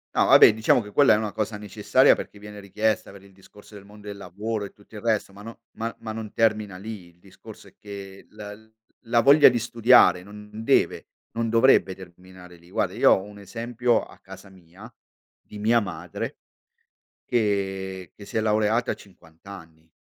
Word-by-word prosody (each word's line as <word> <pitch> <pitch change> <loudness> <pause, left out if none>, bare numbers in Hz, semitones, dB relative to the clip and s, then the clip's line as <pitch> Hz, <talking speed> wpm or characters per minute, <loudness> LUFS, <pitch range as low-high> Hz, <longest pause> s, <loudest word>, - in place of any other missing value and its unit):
No - - +3
vabbè, - - +7
diciamo 110 +2 +2
che 105 - -11
quella 140 0 +5
è - - +3
una 105 -1 -3
cosa 110 0 -3
necessaria, 105 -2 +2
perché 105 - -9
viene 105 0 -11
richiesta 105 +2 -2
per 100 0 -15
il 100 -1 -19
discorso 105 +2 -18
del 100 - -12
mond 105 +1 -16
del 100 -1 -8
lavoro 100 +3 -5
e 100 - -11
tutto 105 +2 -20
il 105 - -8
resto, 110 -4 -1
ma 100 - -13
no 115 0 -11
ma 115 +1 -5
ma 110 - -7
non 110 -1 -7
termina 105 -4 0
lì; 100 -2 -9
il 85 0 -27
discorso 95 +1 -15
è - - -20
che 100 -1 -11
la 105 -1 -10 0.5
la 115 +1 +1
voglia 140 +5 +7
di 120 -1 -1
studiare 115 -6 +4
non 105 +1 -13
non 110 - -8
deve - - +1 0.3
non 115 -1 -1
dovrebbe 115 -5 +3
terminare 90 0 -15
lì. 85 +1 -21
Guarda - - -1
io - - +4
ho - - +3
un 105 +1 -12
esempio 120 +3 -1
a - - -15
casa 100 - -14
mia, 95 +4 -16 0.5
di 105 - -12
mia 115 +3 +3
madre 100 - -7 0.9
che 95 -5 -2
che 100 - -13
si 110 - -5
è - - +2
laureata 110 +2 +1
a - - -4
50 80 -4 -21
anni 80 -4 -13
105 Hz, 195 wpm, -24 LUFS, 95-110 Hz, 0.9 s, vabbè